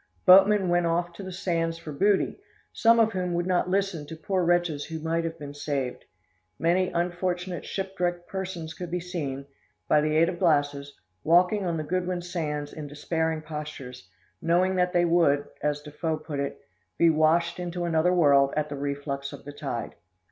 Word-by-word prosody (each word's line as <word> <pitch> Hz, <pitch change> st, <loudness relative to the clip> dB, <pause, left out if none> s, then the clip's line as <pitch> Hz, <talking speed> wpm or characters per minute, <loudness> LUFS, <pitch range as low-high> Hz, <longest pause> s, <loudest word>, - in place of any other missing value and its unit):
Boatmen 195 Hz, +1 st, +7 dB
went 175 Hz, -1 st, +2 dB
off 170 Hz, +1 st, 0 dB
to 170 Hz, -, -9 dB
the 185 Hz, -1 st, -6 dB
sands 170 Hz, -3 st, -1 dB
for 165 Hz, -2 st, -8 dB
booty, 195 Hz, +7 st, +1 dB, 0.3 s
some 230 Hz, 0 st, +4 dB
of 225 Hz, -1 st, +4 dB
whom 180 Hz, -2 st, -1 dB
would 175 Hz, 0 st, 0 dB
not 180 Hz, 0 st, +1 dB
listen 195 Hz, -4 st, 0 dB
to 160 Hz, -, -7 dB
poor 185 Hz, +3 st, -1 dB
wretches 175 Hz, -4 st, +1 dB
who 160 Hz, -, -5 dB
might 165 Hz, +1 st, -1 dB
have 165 Hz, 0 st, -4 dB
been 145 Hz, -1 st, -8 dB
saved. 140 Hz, -3 st, -3 dB, 0.5 s
Many 180 Hz, -, +2 dB
unfortunate 175 Hz, +1 st, -2 dB
shipwrecked 180 Hz, -2 st, -3 dB
persons 185 Hz, -4 st, -5 dB
could 180 Hz, 0 st, -7 dB
be 180 Hz, +1 st, -1 dB
seen, 150 Hz, -7 st, -4 dB, 0.4 s
by 150 Hz, -, +4 dB
the 155 Hz, +1 st, +1 dB
aid 165 Hz, +1 st, +5 dB
of 175 Hz, -1 st, -4 dB
glasses, 145 Hz, -4 st, +1 dB, 0.3 s
walking 180 Hz, +5 st, +3 dB
on 170 Hz, -1 st, -1 dB
the 155 Hz, -, -2 dB
Goodwin 180 Hz, +2 st, -2 dB
Sands 150 Hz, -5 st, -3 dB
in 150 Hz, -2 st, -7 dB
despairing 160 Hz, +2 st, -2 dB
postures, 150 Hz, -9 st, -8 dB, 0.3 s
knowing 180 Hz, +3 st, +2 dB
that 180 Hz, 0 st, +2 dB
they 175 Hz, -1 st, +3 dB
would, 165 Hz, -4 st, +3 dB
as 150 Hz, 0 st, -1 dB
Defoe 155 Hz, +2 st, -3 dB
puts 155 Hz, -2 st, -5 dB
it, 140 Hz, -, -4 dB, 0.4 s
'be 170 Hz, -1 st, +5 dB
washed 160 Hz, +3 st, +2 dB
into 175 Hz, 0 st, -3 dB
another 165 Hz, +1 st, +2 dB
world' 140 Hz, -6 st, +4 dB
at 150 Hz, 0 st, 0 dB
the 145 Hz, -, -5 dB
reflux 140 Hz, 0 st, -3 dB
of -, -, -11 dB
the 145 Hz, -, -8 dB
tide. 135 Hz, -5 st, -4 dB
165 Hz, 180 wpm, -26 LUFS, 150-180 Hz, 0.5 s, Boatmen